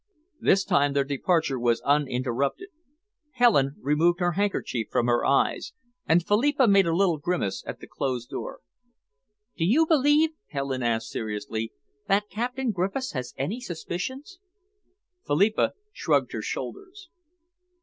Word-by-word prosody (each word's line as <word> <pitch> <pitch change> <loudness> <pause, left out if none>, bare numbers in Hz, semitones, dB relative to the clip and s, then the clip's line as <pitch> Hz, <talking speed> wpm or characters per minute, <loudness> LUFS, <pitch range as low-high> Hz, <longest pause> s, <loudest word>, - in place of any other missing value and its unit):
This 195 +1 +3
time 140 0 +2
their 140 0 +2
departure 140 0 0
was 120 -1 +2
uninterrupted. 140 - 0 0.6
Helen 205 - +3
removed 160 +5 +2
her 175 -1 +1
handkerchief 175 - -1
from 120 - +1
her 120 0 +2
eyes, 435 - +1 0.3
and 165 +1 +3
Philippa 260 +5 +3
made 195 -3 +5
a 165 - +1
little 175 -4 +2
grimace 145 - -2
at - - -6
the - - -8
closed 125 -3 -4
door. - - -6 0.9
"Do 165 - -2
you 255 - +4
believe," 305 0 +4 0.2
Helen 140 -2 -3
asked 115 -2 -1
seriously, 110 +1 -4 0.4
"that 205 +1 +1
Captain 250 +2 -2
Griffiths 200 +8 -2
has 125 -3 -5
any 195 - -3
suspicions?" 260 - -6 0.9
Philippa 200 +9 +2 0.2
shrugged - - +1
her - - -4
shoulders. 390 -2 -7
175 Hz, 130 wpm, -26 LUFS, -, 0.9 s, made